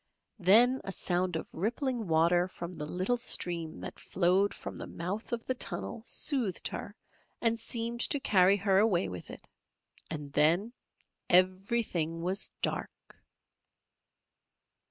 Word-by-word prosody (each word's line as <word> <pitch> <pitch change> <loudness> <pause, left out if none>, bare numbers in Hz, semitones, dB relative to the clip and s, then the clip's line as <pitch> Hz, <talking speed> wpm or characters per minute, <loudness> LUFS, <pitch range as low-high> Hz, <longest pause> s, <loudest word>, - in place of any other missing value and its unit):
Then 235 +8 +6
a 195 - -4
sound 180 -1 -1
of 160 - -4
rippling 235 - -2
water 170 +2 +3
from 175 -1 -8
the 150 -3 -6
little 185 +7 0
stream 170 -8 +1
that - - -7
flowed 190 +2 +2
from - - -8
the - - -7
mouth 185 +6 -5
of 235 -1 -3
the 255 - 0
tunnel 240 -2 -4
soothed 255 - 0
her - - -7 0.4
and 230 -1 +1
seemed 235 +1 -2
to 285 - +1
carry 195 -5 +4
her 195 -1 +2
away 205 -5 +2
with 90 -2 -8
it, - - -11 0.6
and 145 -3 -6
then 170 +10 +3 0.6
everything 185 -2 +1
was 190 +4 0
dark. - - -5
185 Hz, 135 wpm, -30 LUFS, 175-230 Hz, 0.6 s, Then